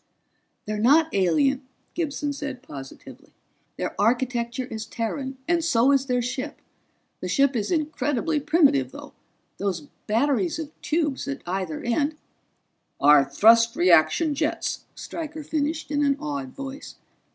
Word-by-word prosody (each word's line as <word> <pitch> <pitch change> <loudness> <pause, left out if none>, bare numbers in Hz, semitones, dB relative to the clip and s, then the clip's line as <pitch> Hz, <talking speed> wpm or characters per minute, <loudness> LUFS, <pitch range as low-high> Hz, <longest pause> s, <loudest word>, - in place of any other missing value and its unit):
"They're 215 0 -3
not 305 +8 +4
alien," 260 - +2 0.3
Gibson 295 -3 -2
said 270 -2 -6
positively. 135 - -11 0.4
"Their - - -3
architecture 240 +2 0
is 220 -2 -6
Terran, 265 +4 -4
and 340 -1 +2
so 260 -4 +3
is 275 -1 +2
their 250 -2 +1
ship. 255 +2 -4 0.6
The - - -4
ship 275 -1 +2
is 215 -3 -1
incredibly 305 -2 0
primitive, 275 - +3
though; - - -10 0.5
those 190 -4 -1 0.3
batteries 280 - +1
of 315 -2 -6
tubes 300 -4 -1
at 280 0 -5
either 180 -3 -3
end 285 +6 0 0.5
" - - -49
"Are 150 -2 +8
thrust 230 +11 +5
reaction 175 - +4
jets," 315 +3 -2
Stryker 310 -2 -6
finished 310 +1 -2
in 290 0 +1
an 280 -1 +2
awed 140 -3 -5
voice. 275 +1 -8
270 Hz, 135 wpm, -25 LUFS, 220-295 Hz, 0.6 s, Are